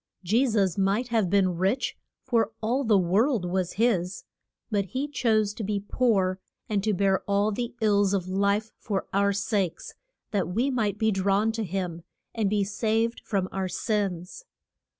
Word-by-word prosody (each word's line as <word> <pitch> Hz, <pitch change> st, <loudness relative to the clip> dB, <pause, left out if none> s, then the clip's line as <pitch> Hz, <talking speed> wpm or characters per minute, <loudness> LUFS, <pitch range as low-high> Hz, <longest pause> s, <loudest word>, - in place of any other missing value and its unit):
Je 225 Hz, +9 st, +3 dB
sus 200 Hz, -5 st, +1 dB
might 200 Hz, +6 st, +1 dB
have 220 Hz, -6 st, +1 dB
been 185 Hz, -2 st, +2 dB
rich, 195 Hz, +9 st, 0 dB, 0.3 s
for 230 Hz, -4 st, +1 dB
all 245 Hz, +5 st, 0 dB
the 220 Hz, -4 st, +4 dB
world 195 Hz, +5 st, +2 dB
was 180 Hz, 0 st, -1 dB
his; 195 Hz, -5 st, 0 dB, 0.5 s
but 200 Hz, -2 st, +1 dB
he 260 Hz, +8 st, -3 dB
chose 220 Hz, -7 st, +1 dB
to 220 Hz, -, -6 dB
be 205 Hz, 0 st, -1 dB
poor, 195 Hz, -3 st, +1 dB, 0.3 s
and 205 Hz, -2 st, 0 dB
to 215 Hz, -, +2 dB
bear 195 Hz, -1 st, +2 dB
all 200 Hz, +1 st, +2 dB
the 240 Hz, +3 st, -4 dB
ills 205 Hz, -2 st, +3 dB
of 190 Hz, -3 st, -1 dB
life 200 Hz, +3 st, 0 dB
for 200 Hz, -4 st, -2 dB
our 200 Hz, +1 st, +3 dB
sakes, 200 Hz, -3 st, -2 dB, 0.4 s
that 195 Hz, -6 st, 0 dB
we 235 Hz, +10 st, 0 dB
might 215 Hz, -5 st, 0 dB
be 220 Hz, 0 st, +2 dB
drawn 200 Hz, +3 st, +2 dB
to 225 Hz, 0 st, -3 dB
him, 180 Hz, -3 st, -3 dB, 0.3 s
and 215 Hz, -4 st, 0 dB
be 205 Hz, 0 st, +1 dB
saved 225 Hz, +3 st, 0 dB
from 195 Hz, -3 st, -1 dB
our 190 Hz, -1 st, -2 dB
sins. 200 Hz, -, -2 dB
205 Hz, 170 wpm, -26 LUFS, 190-225 Hz, 0.5 s, the